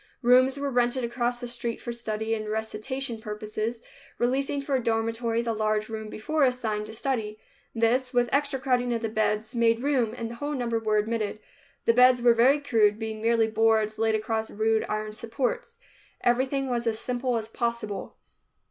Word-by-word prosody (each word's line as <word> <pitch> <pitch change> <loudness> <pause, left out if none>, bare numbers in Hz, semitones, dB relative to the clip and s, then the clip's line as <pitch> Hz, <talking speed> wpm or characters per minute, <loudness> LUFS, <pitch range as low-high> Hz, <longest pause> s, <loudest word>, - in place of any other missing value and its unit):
Rooms 255 +2 +5
were 280 0 -2
rented 245 +1 +1
across 240 0 -1
the 245 - -5
street 240 -1 -3
for 240 - -5
study 220 -1 -3
and 215 -1 -3
recitation 220 +3 -3
purposes, 215 +1 -4 0.3
releasing 270 +3 0
for 275 0 -3
a 260 -2 +1
dormitory 230 +1 0
the 230 -1 -1
large 215 0 0
room 220 -1 -5
before 300 +9 -1
assigned 225 -5 0
to 220 - -8
study. 220 -3 -2 0.4
This, 245 +3 +2
with 245 -2 +2
extra 280 -1 +1
crowding 250 -2 +1
of 230 - -4
the 225 - 0
beds, 215 0 0
made 230 0 +2
room, 250 -6 +1
and 230 -1 -4
the - - -7
whole 290 +2 -3
number 235 -3 -1
were 215 -1 +1
admitted. 215 -1 -1 0.5
The 230 - +5
beds 250 +1 +6
were 240 0 +5
very 255 +5 +4
crude, 220 -7 +3
being 220 -1 -5
merely 230 0 +3
boards 220 -1 +2
laid 220 0 +2
across 220 0 -2
rude 220 +1 +1
iron 215 0 -2
supports. 270 - -3 0.4
Everything 260 +3 +1
was 240 -2 -1
as 220 -1 +1
simple 250 +1 -1
as 220 -1 -4
possible. 235 -2 -3
230 Hz, 180 wpm, -27 LUFS, 220-250 Hz, 0.5 s, beds